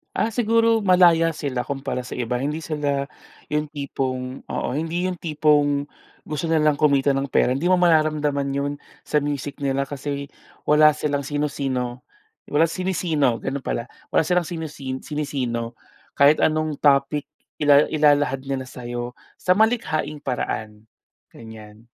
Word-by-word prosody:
Ah, - - +1
siguro 230 -1 +3
malaya 175 -3 +5
sila 135 -5 -3
kumpara 135 -2 -4
sa 125 - -7
iba. 125 0 -2
Hindi 150 +3 -2
sila 145 -3 -2 0.4
'yong 150 -1 -2
tipong, 130 -3 -4
oo, - - -4
hindi 165 +4 -1
'yong 185 - -1
tipong 145 -2 +2 0.4
gusto 155 +2 -3
nilang 155 -2 +3
kumita 140 -2 +3
ng 135 -1 -2
pera. 125 - +3
Hindi 165 +7 0
mo 185 - +5
mararamdaman 155 -4 +2
'yon 140 +1 -1 0.3
sa 150 - +1
music 145 -1 -4
nila, 140 0 0
kasi 140 0 -4 0.4
wala 150 0 +6
silang 145 -2 -1
sino-sino. 135 -4 -2 0.5
Wala 155 +3 +4
sinisino, 165 -8 0
gano'n 135 0 -4
pala. 115 - -3 0.2
Wala 160 - +2
silang 180 +1 +2
sinisin 155 -6 -5
sinisino. 130 -6 -3 0.4
Kahit 140 +2 +5
anong 155 -2 0
topic 145 +1 +2 0.3
ila 145 0 +6
ilahad 145 -3 +2
nila 135 -1 -4
sa'yo 120 -1 -6 0.2
sa 180 - +3
malikhaing 210 -9 +1
paraan. 110 -5 -4 0.4
Ganyan. 110 -1 -13
145 Hz, 135 wpm, -23 LUFS, 135-155 Hz, 0.5 s, wala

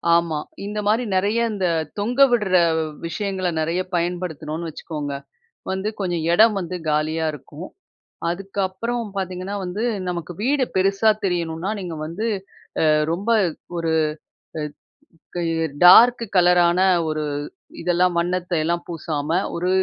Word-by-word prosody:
ஆமா. 170 -2 +1 0.3
இந்த 210 +1 -3
மாரி 220 +4 +3
நிறைய 205 +5 +2
இந்த 195 -3 -1 0.3
தொங்க 240 +6 -2
விட்ற 210 -6 +1 0.5
விஷயங்கள 190 +1 -2
நிறைய 165 +3 0 0.2
பயன்படுத்துனோம்னு 170 -2 -3
வச்சுக்கோங்க, 150 -2 -5 0.6
வந்து 190 +2 -1
கொஞ்சம் 175 -4 -1
இடம் 215 +4 +6
வந்து 180 -1 -4
காலியா 155 +2 0
இருக்கும். 150 +4 -9 0.6
அதுக்கப்புறம் 195 +5 -3
பாத்தீங்கன்னா, 185 +1 -3
வந்து 190 +5 -3 0.2
நமக்கு 175 -1 -4
வீடு 270 +2 +2
பெருசா 195 +3 +3
தெரியணுனா, 170 0 -1
நீங்க 175 -3 -5
வந்து 180 +8 -3 0.6
அ - - +4 0.3
ரொம்ப 195 +7 -2 0.5
ஒரு 165 -1 -1 1.3
அ - - -39 0.2
கய 165 -2 0 0.2
டார்க் 235 +7 +8
கலரான 175 -1 +5 0.3
ஒரு 155 0 -2 0.6
இதெல்லாம் 175 +1 +2
வண்ணத்தையெல்லாம் 170 -1 -1
பூசாம, 155 -3 -4 0.3
ஒரு 180 +2 -1
180 Hz, 115 wpm, -22 LUFS, 165-195 Hz, 1.3 s, டார்க்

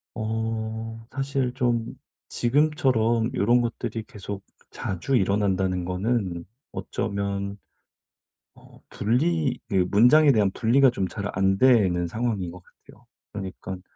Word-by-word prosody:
어 110 0 -3
사실 135 -2 -1
좀 120 -3 0 0.4
지금처럼 125 -4 +2
요런 120 +5 +3
것들이 115 -1 -3
계속 100 -1 -7 0.3
자주 95 +9 -2
일어난다는 95 -3 +1
거는 90 -2 -1 0.3
어쩌면 100 0 -3 1.0
어 - - -18
분리 140 +5 0
그 95 -4 +2
문장에 140 +8 +6
대한 105 -5 +3
분리가 130 +6 +4
좀 95 -6 -2
잘 105 +1 -4
안 95 0 +2
되는 100 -9 +4
상황인 110 -3 -2
것 90 0 -12
같아요. - - -21 0.3
그러니깐 95 -2 -6
110 Hz, 235 characters per minute, -25 LUFS, 95-120 Hz, 1.0 s, 문장에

